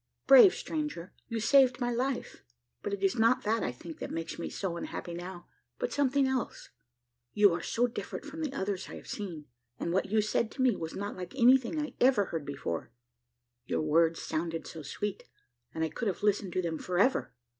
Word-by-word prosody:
Brave 275 +8 +9
stranger! 300 - -4
you 230 -2 -2
saved 260 +3 +5
my 245 -1 0
life; 250 +2 -2 0.4
but - - -3
it 200 -1 -3
is 195 +5 +2
not 245 +3 +4
that, 220 +1 +1
I - - -1
think, 160 +6 -10
that - - -5
makes 165 0 -5
me - - -3
so 185 -4 -3
unhappy 170 0 -5
now, 175 +1 -7 0.3
but - - -2
something 280 -1 +2
else. 265 -2 -3 0.6
You 205 -3 +5
are 170 - -2
so 235 +7 +1
different 235 0 -5
from 310 +2 -7
the 305 -4 -2
others 195 -7 -3
I - - -7
have - - -10
seen; 175 -8 -5 0.3
and 170 - -2
what 190 - +1
you 215 +2 +3
said 215 +1 +1
to 260 - -1
me 250 -5 +4
was 160 -2 -5
not 200 +1 -4
like 180 +3 -7
anything 260 +3 +4
I 295 0 -3
ever 250 -6 +4
heard 160 -5 -5
before; 120 - -4 0.8
your - - 0
words 165 +2 +3
sounded 165 +1 -3
so 160 - -8
sweet, 200 +7 -4 0.5
and 160 - -2
I 160 - 0
could 235 - -3
have 195 0 -2
listened 200 -3 +1
to 185 - 0
them 165 -2 -2
for 180 -1 -3
ever. 250 +8 +2
205 Hz, 205 wpm, -30 LUFS, 170-255 Hz, 0.8 s, Brave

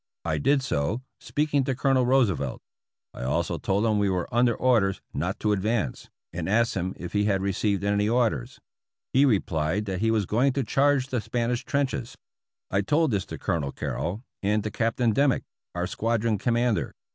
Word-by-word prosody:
I 80 -2 0
did 140 - +2
so, 110 - -1 0.2
speaking 145 -2 0
to 130 - -1
Colonel 130 -1 +2
Roosevelt. 100 - +2 0.5
I - - -9
also 65 +1 -1
told 100 +3 0
him 110 -2 +2
we 100 -1 +2
were 90 -2 -1
under 120 0 +3
orders 115 -7 +2
not 90 +7 -2
to 105 - +2
advance, 105 - -1 0.2
and 85 +1 -3
asked 115 +3 +2
him 95 0 -2
if 90 - -7
he 105 0 +2
had 95 -2 +1
received 100 0 0
any 105 +1 +1
orders. 115 - 0 0.5
He 135 +2 +5
replied 95 - +1
that 95 -2 -3
he 115 - +2
was 110 -3 +2
going 125 +8 +2
to 135 0 0
charge 135 +2 +2
the 125 -3 -1
Spanish 120 +1 -1
trenches. 135 -4 -1 0.6
I 95 - +2
told 150 +7 +2
this 100 -2 -1
to - - -6
Colonel 80 -8 -1
Carrol, 95 +8 -4 0.2
and 105 +1 +1
to 110 - -3
Captain 115 +1 +1
Dimmick, 140 +2 +2 0.3
our 90 0 -1
squadron 115 +2 0
commander. 120 0 0
110 Hz, 180 wpm, -26 LUFS, 95-125 Hz, 0.6 s, He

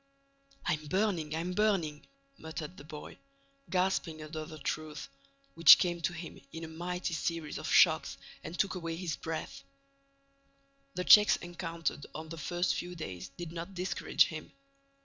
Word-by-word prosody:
"I'm 155 -3 -1
burning! 175 -4 0
I'm 170 +3 -2
burning!" 180 -8 +1 0.3
muttered 160 +1 -6
the - - -10
boy, 150 0 -10 0.5
gasping 180 -4 0
under 155 0 -6
the 155 -1 -9
truth, 155 +1 -4 0.5
which 165 -1 +10
came 175 -1 -1
to 165 - 0
him 170 0 -8
in 165 - -7
a - - -5
mighty 175 +2 -3
series 165 -1 -2
of - - -4
shocks - - +5 0.3
and 175 - -6
took 195 - +1
away 165 -3 -4
his 170 -2 -3
breath. 160 -1 -5 1.3
The 180 - -1
checks 210 +3 +8
encountered 170 -3 -4
on 160 0 -6
the 165 0 -7
first 175 +2 0
few 180 0 -5
days, 95 - -6
did 175 -2 -6
not 170 +3 -7
discourage 180 +1 +2
him. 155 -1 -7
165 Hz, 150 wpm, -32 LUFS, 155-180 Hz, 1.3 s, which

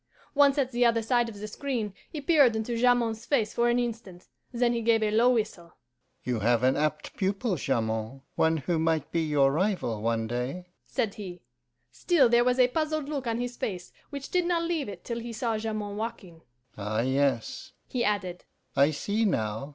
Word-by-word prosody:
Once 285 -1 +5
at 265 -2 +1
the 245 0 +1
other 230 -1 +3
side 240 0 +2
of 205 -3 -10
the 210 - -5
screen, 225 -3 -3 0.2
he 305 - -6
peered 280 -5 +4
into 220 +2 -2
Jamond's 235 -2 +2
face 225 -7 +1
for 240 0 +2
an 240 - +2
instant, 225 -7 -4 0.2
then 240 -1 +1
he 235 - -1
gave 225 -1 +3
a 210 - +1
low 230 +3 +4
whistle. 210 -8 -2 0.5
'You 125 -3 -1
have 115 +2 +2
an 130 +1 +4
apt 150 0 -2
pupil, 195 +2 0
Jamond, 115 -2 -2
one 160 0 +2
who 165 +3 -1
might 160 -2 0
be 165 - +1
your 145 -3 +3
rival 160 - 0
one 115 0 0
day,' 125 +10 -3 0.2
said 210 -3 -1
he. 185 -4 -8 0.5
Still 305 -9 +3
there 240 0 +5
was 250 +1 +2
a 250 -1 +5
puzzled 310 0 -1
look 280 -5 -3
on 230 0 -1
his 245 0 -4
face, 180 -4 -4 0.2
which 280 -2 -7
did 360 -1 +2
not 340 -1 +1
leave 330 -7 -1
it 200 - -9
till 235 -1 -4
he 235 0 -6
saw 230 0 -1
Jamond 215 -2 -4
walking. 200 -7 -6 0.4
'Ah 105 +2 -1
yes,' 135 - 0
he 245 -2 -1
added, 190 -4 -1 0.3
'I 140 +1 +5
see 205 +9 -1
now. 110 - -1
215 Hz, 195 wpm, -28 LUFS, 160-245 Hz, 0.5 s, Once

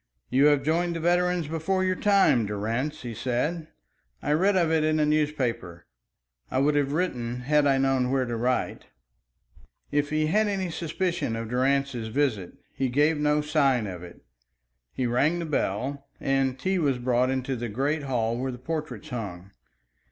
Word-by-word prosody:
"You 135 +3 +4
have 145 -2 +4
joined 170 +3 0
the - - -2
veterans 175 0 +1
before 165 +4 -1
your 185 0 +1
time, 195 - +3
Durrance," 115 +9 -3
he 120 -2 -5
said. 130 +8 -2 0.6
"I 145 - 0
read 190 +6 +3
of 170 -3 +2
it 160 -1 +2
in 155 0 +2
a 150 - +3
newspaper. 135 - -1 0.6
I - - -2
would 145 +3 +3
have 145 -1 +1
written 125 -8 -2
had 150 +2 +3
I 135 -1 +3
known 135 -2 +1
where 130 -1 +1
to 120 -1 -3
write." 125 +2 -1 1.1
If 145 0 +1
he 155 0 +1
had 210 +7 +2
any 190 -3 -2
suspicion 170 -5 -2
of 115 -1 -5
Durrance's 130 -1 0
visit, 110 -7 -1 0.2
he 135 -1 -1
gave 150 +4 +2
no 150 0 +2
sign 140 -6 +2
of 90 -3 -6
it. 90 -1 -12 0.7
He 130 - -2
rang 140 +8 +2
the 170 - -3
bell, 140 0 -2
and 135 -1 0
tea 190 +6 0
was 140 -5 +1
brought 125 0 +1
into 130 0 -1
the 120 -1 -4
great 140 +8 -1
hall 120 -4 -1
where 130 +1 -2
the 125 - -7
portraits 155 +2 -5
hung. 100 -7 -6
140 Hz, 175 wpm, -26 LUFS, 125-155 Hz, 1.1 s, You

